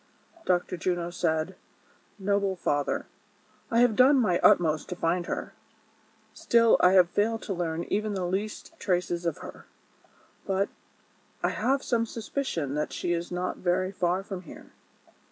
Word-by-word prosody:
Dr. 180 0 +1
Juno 175 0 -1
said: 165 +1 -1 0.3
" - - -33 0.3
Noble 200 -1 0
father, 145 -5 -1 0.6
I 230 +1 +3
have 245 -3 +4
done 265 +4 +6
my 185 -8 +2
utmost 155 -3 +3
to 180 - -4
find 175 0 0
her; - - -4 0.8
still, 230 -1 +4
I 180 - +5
have 180 -2 +5
failed 225 +2 0
to 200 - -3
learn 170 -2 -2
even 210 +2 -1
the 185 -2 -2
least 195 +4 -3
traces 175 -2 -1
of 165 - -1
her; - - -11 0.8
but, 195 +1 +1 0.7
I - - +3
have 270 +2 0
some 230 -2 0
suspicion 215 - -3
that 150 +1 -2
she 175 - -1
is 170 +1 -3
not 180 +1 -2
very 185 +1 0
far 185 0 0
from 195 -2 -6
here." 175 - -13
185 Hz, 155 wpm, -27 LUFS, 175-210 Hz, 0.8 s, done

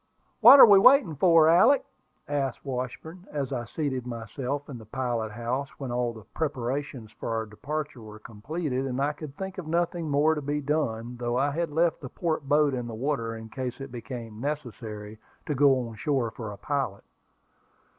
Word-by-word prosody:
"What 250 +5 +10
are - - +13
we 200 -3 +7
waiting 250 - +6
for, 165 0 +5
Alick?" 225 - +5 0.4
asked 140 -3 -2
Washburn, 140 +8 -6
as 140 -2 -3
I 120 -2 -3
seated 130 -1 -3
myself 125 +4 -4
in 130 -5 -8
the - - -11
pilot 120 -2 -2
house 120 +5 -3
when 135 -3 -5
all 120 -1 0
the 110 -2 -12
preparations 135 -5 -3
for - - -7
our 110 0 -1
departure 140 +5 -5
were 110 -1 -10
completed, 130 +6 -4
and 130 0 -3
I 145 +2 +1
could 145 -2 -10
think 190 0 -5
of 170 - -7
nothing 170 0 -1
more 145 +3 +3
to 150 - -3
be 145 +1 -2
done, 125 -5 -2
though 120 0 -1
I 140 +2 +2
had 165 +2 -1
left 165 +2 +1
the 130 - -7
port 155 -3 -3
boat 150 -1 +4
in 125 -2 -3
the 115 - -6
water 115 -2 -2
in 110 0 -9
case 130 +1 -5
it 135 -1 -7
became 115 -2 -7
necessary 110 -7 -5 0.3
to 150 - -1
go 135 -3 +3
on 115 - -9
shore 135 -6 0
for 110 -3 -7
a 100 - -9
pilot. 135 -8 -2
135 Hz, 190 wpm, -27 LUFS, 120-150 Hz, 0.4 s, are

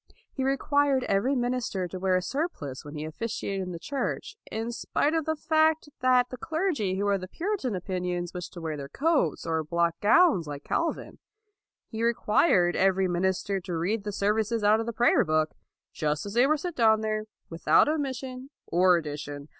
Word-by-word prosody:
He 265 - -3
required 275 0 +2
every 235 +8 +1
minister 245 -7 -1
to 185 +1 -7
wear 185 0 +2
a 185 - +1
surplice 180 - -4
when 145 +1 -9
he 150 +1 -4
offi 160 +9 -5
ciated 195 -3 -3
in 180 -1 -4
the 170 - -5
church, 285 - -4 0.2
in 225 +2 -3
spite 290 +5 0
of 325 -2 0
the 315 - 0
fact 315 0 +2
that 250 -1 +3
the 255 - -6
clergy 310 - -1
who 200 - -1
were 200 - +2
of 195 - -1
the 185 - -6
Puritan 330 - -2
opinions 180 -1 -3
wished 180 -1 -6
to 175 - -8
wear 160 -2 -3
their 140 -1 -7
coats, 285 - 0
or 160 -1 0
black 170 +2 +1
gowns 220 - +4
like 145 -1 -6
Calvin. 335 - -2 0.7
He 220 - -4
required 215 - +3
every 190 0 +3
minister 190 +2 0
to 180 -2 -4
read 200 +6 -1
the 205 - -3
services 210 +2 0
out 210 +2 +5
of 225 - -3
the - - -1
prayer 240 +2 +4
book, 155 -2 +1 0.4
just 150 +2 -1
as 200 - -6
they 245 +3 +4
were 310 +1 +3
set 345 +2 -5
down 220 -2 +4
there, 215 0 -2 0.3
without 165 +10 +4
omission 265 -3 -3 0.2
or 180 +1 +4
addition. 145 -2 -6
210 Hz, 195 wpm, -27 LUFS, 175-265 Hz, 0.7 s, out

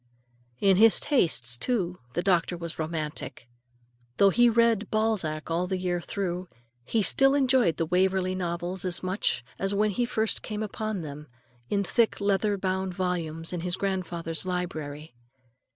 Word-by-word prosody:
In 195 -2 +4
his 225 +1 +7
tastes, 125 - +2
too, 180 - -1
the 175 - -1
doctor 175 -2 +1
was 170 -1 -7
romantic. 155 -5 -4 0.7
Though 200 -1 +5
he 240 +4 +5
read 230 -2 +2
Balzac 195 -9 -1
all 175 +2 0
the 190 0 -1
year 180 -1 -1
through, 180 -1 -4 0.4
he 220 - +1
still 270 +6 +4
enjoyed 260 - +3
the 165 - 0
Waverley 185 +2 +1
Novels 175 0 -3
as 180 -1 -1
much 185 - -1
as 195 +1 -1
when 210 +1 +2
he 240 +5 0
had - - -10
first 220 -2 0
come 215 0 -4
upon 215 -1 -4
them, 150 0 -8 0.4
in 200 -1 +1
thick 230 +4 +1
leather 200 0 +1
bound 190 -1 -2
volumes, 170 -3 -2
in 175 - -3
his 180 +1 -2
grandfather's 175 -4 -1
library. 160 -5 -4
185 Hz, 155 wpm, -27 LUFS, 170-205 Hz, 0.7 s, his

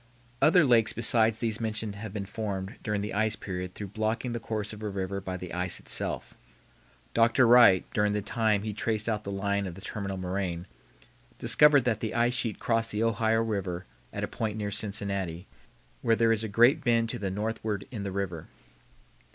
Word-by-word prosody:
Other 165 +1 +6
lakes 115 -4 +4
besides 115 -1 +4
these 115 -1 -2
mentioned 110 -1 -2
have 105 0 -7
been 100 -1 -4
formed 100 -2 -4
during 105 -1 -1
the 105 - -4
ice 110 +1 +1
period 90 -3 -6
through 105 -2 -6
blocking 110 +4 -2
the 120 - -3
course 110 -2 -4
of 105 - -10
a 105 - -3
river 100 0 -3
by 95 -1 -4
the 90 0 -8
ice 90 0 -1
itself. - - -3 0.8
Dr. 115 +2 +4
Wright, 115 -6 +7
during 105 0 +2
the 105 -1 -1
time 110 -2 +1
he 105 -1 -3
traced 110 +1 -1
out 105 -2 -1
the 100 - -5
line 100 0 -1
of 85 - -7
the 95 - -11
terminal 100 -1 -4
moraine, 90 -2 -3 0.7
discovered 150 -3 +5
that 115 -3 0
the 110 0 -3
ice 120 +1 +2
sheet 115 -3 -1
crossed 115 -1 0
the 105 +2 -1
Ohio 115 0 +2
River 95 -5 -3 0.3
at - - -4
a - - 0
point 110 -1 -3
near 105 -1 -3
Cincinnati, 100 -4 -3 0.6
where 115 - +3
there 115 0 +3
is 115 -1 +1
a - - -2
great 120 +9 +4
bend 115 -2 +2
to - - -3
the 100 -1 -2
northward 105 0 -3
in 110 -5 -5
the 100 -1 -4
river. 95 -4 -4
105 Hz, 195 wpm, -28 LUFS, 100-115 Hz, 0.8 s, Wright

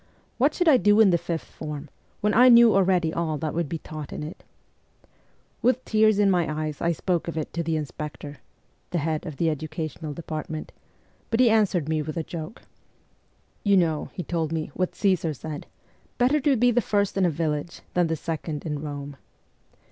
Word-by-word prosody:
What 285 +5 +3
should 355 - +1
I 290 -5 +7
do 205 -2 +4
in 210 -4 +7
the 170 - +4
fifth 165 -1 -3
form, 150 -2 -7 0.3
when 210 0 +2
I 250 +3 +7
knew 235 -1 +8
already 180 -4 +2
all 160 -2 -1
that 155 +1 -3
would 170 -3 -1
be 165 - -2
taught 155 -1 -8
in - - -5
it? 155 +3 -8 1.2
With 255 0 +2
tears 215 -1 +4
in 205 -1 +4
my 175 -4 +1
eyes 155 -2 -5
I 170 - +2
spoke 170 +1 -1
of 170 - -4
it 155 - -4
to 170 - -1
the 165 -1 -1
inspector 150 0 -6 0.5
(the 175 - -1
head 155 0 -2
of 150 -4 -7
the 170 - +1
educational 155 0 -5
department), 155 0 -6 0.6
but 225 - 0
he 245 -3 +6
answered 200 -8 +2
me 155 -1 0
with 155 +1 -5
a 165 - -1
joke. 160 +5 -7 1.0
'You 200 -2 +4
know,' 160 -4 +1
he 180 - -5
told 165 -3 -2
me, 160 -2 -3
'what 185 -1 -2
Caesar 180 -6 +1
said 150 +1 -7 0.5
better 260 +5 +3
to 280 -1 +3
be 245 +1 +4
the 245 +1 +2
first 205 -2 0
in 195 - +2
a 180 - +4
village 155 +1 -3
than 175 -1 +2
the 160 - -1
second 155 -1 -4
in 150 -2 -2
Borne.' 145 -1 -6
165 Hz, 195 wpm, -25 LUFS, 155-200 Hz, 1.2 s, knew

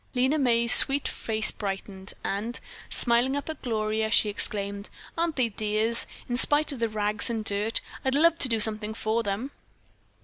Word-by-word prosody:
Lena 260 +5 0
May's 235 -3 +6
sweet 275 +1 +9
face 220 -1 -2
brightened 195 -1 -7
and, 215 +5 -4 0.3
smiling 240 +3 0
up 285 +2 -5
at 315 - -12
Gloria, 220 -2 -3
she 215 -1 +3
exclaimed: 200 -1 -4 0.3
"Aren't 335 -2 -2
they 250 -4 -1
dears, 215 +2 -2 0.2
in 245 - -3
spite 295 +4 +1
of 275 - -8
the 230 -1 -1
rags 210 0 -2
and 225 -2 -4
dirt? 210 +2 0 0.2
I'd 265 0 -1
love 330 +3 +2
to 255 - 0
do 225 -1 -1
something 215 0 -3
for 220 +1 -2
them." 215 +6 -5
225 Hz, 170 wpm, -25 LUFS, 210-255 Hz, 0.3 s, sweet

